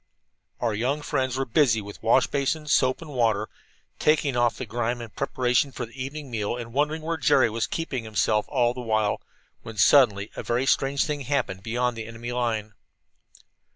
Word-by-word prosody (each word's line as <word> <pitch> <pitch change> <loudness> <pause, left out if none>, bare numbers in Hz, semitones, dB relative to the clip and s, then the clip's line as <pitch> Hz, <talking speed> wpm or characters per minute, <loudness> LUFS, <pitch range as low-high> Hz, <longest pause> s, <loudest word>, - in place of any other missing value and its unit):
Our 115 -3 0
young 130 +8 -1
friends 130 -3 -1
were 135 - 0
busy 120 -2 +3
with 100 -1 -9
wash 125 +3 +4
basin, 145 +2 -1
soap 130 +1 +2
and 155 - -10
water, 110 -5 +1 0.5
taking 150 -3 +2
off 120 -1 +2
the 130 - -4
grime 120 +2 -2
in 115 -1 -7
preparation 130 +2 0
for 125 - -5
the 115 - -17
evening 140 0 -7
meal 110 +1 -2
and 115 -1 -7
wondering 150 +3 0
where 165 +1 -2
Jerry 130 -7 +3
was 115 +1 -1
keeping 140 -7 -3
himself 105 0 +1
all 120 -4 +2
the 125 - -6
while, 110 -3 0 0.4
when 110 -1 -9
suddenly 105 -2 +5
a - - -4
very 120 +2 0
strange 135 +1 +2
thing 150 -2 -3
happened 125 -8 -1
beyond 120 +3 -1
the 110 -1 -6
enemy's 115 +1 -6
line. 110 -3 -1
120 Hz, 185 wpm, -25 LUFS, 115-140 Hz, 0.5 s, suddenly